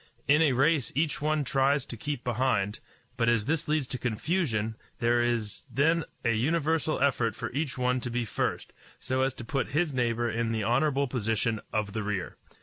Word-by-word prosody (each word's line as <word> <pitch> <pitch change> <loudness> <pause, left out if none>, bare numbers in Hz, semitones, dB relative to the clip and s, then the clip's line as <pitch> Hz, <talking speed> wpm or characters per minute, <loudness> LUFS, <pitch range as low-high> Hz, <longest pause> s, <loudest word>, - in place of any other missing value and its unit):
In 150 +2 +5
a 150 -5 +4
race 140 0 +2
each 150 0 0
one 155 0 +1
tries 135 +1 +2
to - - -6
keep 145 +2 -4
behind; 115 -4 0 0.4
but 115 0 +3
as 115 -3 +2
this 160 +3 0
leads 155 -2 +1
to 125 - -3
confusion, 115 - 0 0.2
there 120 0 +2
is 120 -3 -1
then 160 +6 +2 0.2
a 115 - +4
universal 155 +5 +1
effort 125 -6 +2
for 115 - -5
each 140 0 -2
one 125 0 +1
to 125 - -3
be 120 0 -1
first, - - -2 0.3
so 130 0 -1
as 135 0 +1
to 120 - -8
put 135 +1 -1
his 165 -3 +1
neighbor 120 -2 +1
in 115 0 -1
the 110 -1 -1
honorable 135 +5 +2
position 115 -2 -1
of 105 -2 -1
the 110 - -2
rear. 105 -3 -3
125 Hz, 190 wpm, -28 LUFS, 115-145 Hz, 0.4 s, In